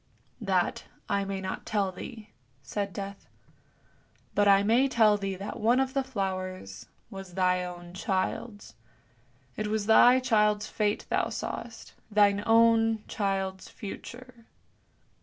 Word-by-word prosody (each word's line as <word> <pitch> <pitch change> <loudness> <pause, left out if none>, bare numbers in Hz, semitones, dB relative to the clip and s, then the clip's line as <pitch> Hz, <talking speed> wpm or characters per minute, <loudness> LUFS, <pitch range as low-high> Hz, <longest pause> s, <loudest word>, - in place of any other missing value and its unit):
" - - -35
"That 180 -2 +1 0.2
I 200 0 0
may 195 -1 -4
not 190 0 -5
tell 200 -3 0
thee," 215 +3 -10 0.3
said 200 +9 -3
Death; 200 0 -7 1.1
"but 205 0 +3
I 200 0 +6
may 235 +6 +4
tell 220 -5 +4
thee 195 -1 -3
that 195 +2 -6
one 235 +4 +3
of 265 0 0
the 275 - +1
flowers 185 - -5 0.2
was 195 -2 -9
thy 180 -1 +2
own 175 -1 -8
child's; 195 - -3 0.8
it 215 - -3
was 215 -1 -1
thy 245 +3 +7
child's 210 -4 +2
fate 210 -1 -1
thou - - +1
sawest, - - -6 0.2
thine 205 -1 +4
own 225 -1 +4
child's 195 -2 -2
future." 235 +3 -10
205 Hz, 135 wpm, -28 LUFS, 190-225 Hz, 1.1 s, thy